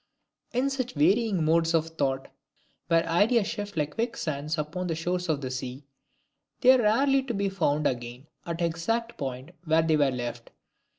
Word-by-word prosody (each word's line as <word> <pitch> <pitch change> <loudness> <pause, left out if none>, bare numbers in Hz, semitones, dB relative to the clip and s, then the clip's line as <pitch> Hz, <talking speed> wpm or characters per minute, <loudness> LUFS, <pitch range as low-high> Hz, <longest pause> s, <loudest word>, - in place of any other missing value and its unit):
In 255 +3 0
such 255 -6 -3
varying 190 +3 +2
modes 165 +1 +3
of 165 0 +1
thought, 135 -4 -2 0.6
where 165 0 +3
ideas 205 +7 +3
shift 205 -3 -5
like 150 -1 -1
quick 235 +1 -2
sands 155 +1 -2
upon 165 +4 -3
the 165 - -1
shores 180 +2 -2
of 150 -2 0
the 130 -2 -4
sea, 130 +1 -5 0.8
they 255 -1 +8
are 255 - +3
rarely 270 +6 +3
to 255 -3 -4
be 200 0 0
found 155 -6 0
again 120 0 -3 0.2
at 170 -1 -4
the 170 - +1
exact 225 +9 -2
point 130 +2 -5
where 160 0 +3
they 160 -1 +3
were 145 -2 +3
left. 120 -2 -5
165 Hz, 180 wpm, -27 LUFS, 145-205 Hz, 0.8 s, they